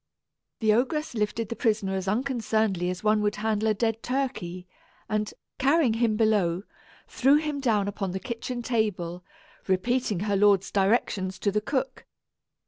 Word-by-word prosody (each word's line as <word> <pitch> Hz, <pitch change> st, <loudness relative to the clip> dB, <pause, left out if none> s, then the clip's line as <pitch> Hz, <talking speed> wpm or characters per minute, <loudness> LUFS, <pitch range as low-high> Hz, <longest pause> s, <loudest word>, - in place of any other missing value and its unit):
The 220 Hz, -1 st, +4 dB
ogress 270 Hz, +7 st, 0 dB
lifted 215 Hz, 0 st, -1 dB
the 230 Hz, -, -3 dB
prisoner 210 Hz, -5 st, 0 dB
as 190 Hz, 0 st, -3 dB
unconcernedly 220 Hz, -5 st, 0 dB
as 185 Hz, +2 st, -5 dB
one 215 Hz, 0 st, +3 dB
would 210 Hz, 0 st, 0 dB
handle 215 Hz, 0 st, 0 dB
a 215 Hz, -, +2 dB
dead 225 Hz, +1 st, -1 dB
turkey 240 Hz, -10 st, -3 dB, 0.4 s
and, 215 Hz, 0 st, -1 dB, 0.3 s
carrying 275 Hz, -2 st, +3 dB
him 225 Hz, -2 st, +1 dB
below, 200 Hz, -5 st, +2 dB, 0.4 s
threw 270 Hz, +3 st, +3 dB
him 300 Hz, -1 st, 0 dB
down 215 Hz, -7 st, +1 dB
upon 200 Hz, -1 st, -3 dB
the 190 Hz, +2 st, -3 dB
kitchen 240 Hz, +1 st, -5 dB
table, 190 Hz, -7 st, -1 dB, 0.4 s
repeating 205 Hz, +1 st, 0 dB
her 205 Hz, -1 st, 0 dB
lord's 200 Hz, -1 st, +3 dB
directions 195 Hz, -2 st, +1 dB
to 200 Hz, +2 st, 0 dB
the 210 Hz, +1 st, 0 dB
cook. 265 Hz, +4 st, -3 dB
215 Hz, 150 wpm, -27 LUFS, 195-240 Hz, 0.4 s, The